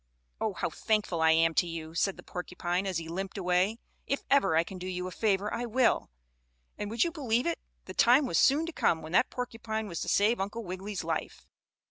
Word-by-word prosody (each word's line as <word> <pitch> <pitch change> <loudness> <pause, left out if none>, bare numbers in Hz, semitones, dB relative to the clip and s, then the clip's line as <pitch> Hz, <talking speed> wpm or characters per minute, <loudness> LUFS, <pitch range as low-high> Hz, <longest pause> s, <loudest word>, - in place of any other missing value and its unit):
"Oh, - - -1
how - - -2
thankful 210 -6 0
I 160 - +5
am 165 +1 +4
to 175 - +2
you," 160 -1 -6
said 190 +3 0
the - - -11
porcupine, 180 +1 -3
as 185 -3 -1
he 165 -1 -5
limped 190 +4 -4
away. 185 +3 +1 0.3
"If 275 - -1
ever 275 - +4
I 165 - +4
can 185 +2 -9
do 180 - -5
you 180 -1 -3
a 185 - -5
favor 205 0 0
I 240 +1 -2
will." 240 +1 +2 0.7
And, 205 - -4
would 225 +1 +2
you 340 - -1
believe 250 -7 0
it? 170 - -1 0.3
the - - -8
time 255 +5 +5
was 250 - +1
soon 290 +4 +4
to 335 - -6
come 165 - +1
when 160 - -8
that 210 +8 +4
porcupine 225 -3 -4
was 170 -4 -5
to - - -2
save 210 +2 +3
Uncle 210 +4 -4
Wiggily's 190 +1 -5
life. 160 -1 -4
195 Hz, 220 wpm, -30 LUFS, 175-230 Hz, 0.7 s, I